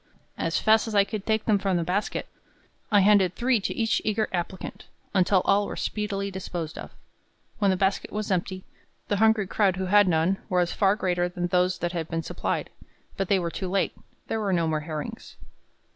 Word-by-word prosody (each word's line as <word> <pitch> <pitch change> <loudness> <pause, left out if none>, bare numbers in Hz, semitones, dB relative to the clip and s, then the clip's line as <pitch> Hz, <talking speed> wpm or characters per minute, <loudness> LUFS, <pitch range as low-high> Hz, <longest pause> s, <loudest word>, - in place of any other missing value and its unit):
As 165 - 0
fast 220 +1 +3
as 220 - -4
I 200 - +6
could 205 0 -6
take 220 -1 +1
them 210 -3 +3
from 190 -2 0
the 170 - 0
basket, 185 +5 -2 0.6
I 205 -1 +6
handed 195 -2 +4
three 245 -1 +2
to 195 - -3
each 225 -1 +1
eager 215 0 0
applicant, 180 +1 -4 0.3
until 185 -1 +3
all 205 +1 +3
were - - -5
speedily 200 -2 -3
disposed 175 -4 -5
of. - - -8 0.7
When 200 -2 +3
the 190 - +2
basket 195 +1 0
was 210 -1 -3
empty, 185 +1 -1 0.5
the 205 - +1
hungry 220 -1 +4
crowd 195 -1 +1
who 190 +1 -2
had 205 +1 +5
none, 170 +3 +2
was 180 -1 +1
far 195 -1 +3
greater 180 -4 0
than 175 0 -3
those 180 +1 +2
that 175 - -2
had 165 -3 -3
been 165 0 -2
supplied; - - -3 0.4
but 195 - -2
they 200 - +4
were 170 -2 -2
too 185 +1 -4
late; 195 +1 0 0.3
there 225 - -2
were 205 -2 -1
no 170 -3 +1
more 155 -1 0
herrings. 150 -1 -7
190 Hz, 200 wpm, -26 LUFS, 180-205 Hz, 0.7 s, I